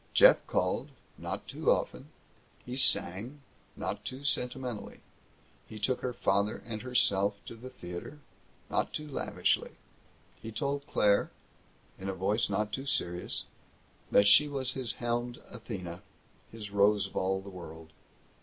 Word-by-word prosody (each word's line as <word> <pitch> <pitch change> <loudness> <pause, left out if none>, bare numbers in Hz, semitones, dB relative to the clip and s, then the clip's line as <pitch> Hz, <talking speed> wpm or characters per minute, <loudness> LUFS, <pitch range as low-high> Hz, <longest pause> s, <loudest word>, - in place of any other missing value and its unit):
Jeff - - +9
called - - 0 0.3
not - - -5
too - - -1
often. - - +1 0.6
He 125 - -5
sang 120 +2 +2 0.3
not 100 +2 -3
too 130 +5 -6
sentimentally. 125 -4 -2 0.7
He 110 - -8
took 125 +5 0
her 125 - -1
father 100 -2 +1
and 110 -2 -4
herself 100 -5 +3
to - - -8
the 125 +3 -9
theater 90 +3 -7 0.5
not - - 0
too 150 - -4
lavishly. 145 - 0 0.7
He 115 - -6
told 140 +5 -2
Claire 100 -1 +3 0.7
in 95 +1 -4
a 95 - -2
voice 100 +5 +1
not 105 +2 0
too 135 +4 -4
serious 90 -12 0 0.7
that 100 - +6
she 105 +9 +8
was 135 -3 -2
his 125 -5 -2
helmed 120 0 -2
Athena, 95 -7 -6 0.5
his 105 -3 -8
rose 100 0 +4
of 100 - -10
all 95 0 +1
the 95 +1 -9
world. 80 -3 -10
110 Hz, 140 wpm, -31 LUFS, 100-130 Hz, 0.7 s, Jeff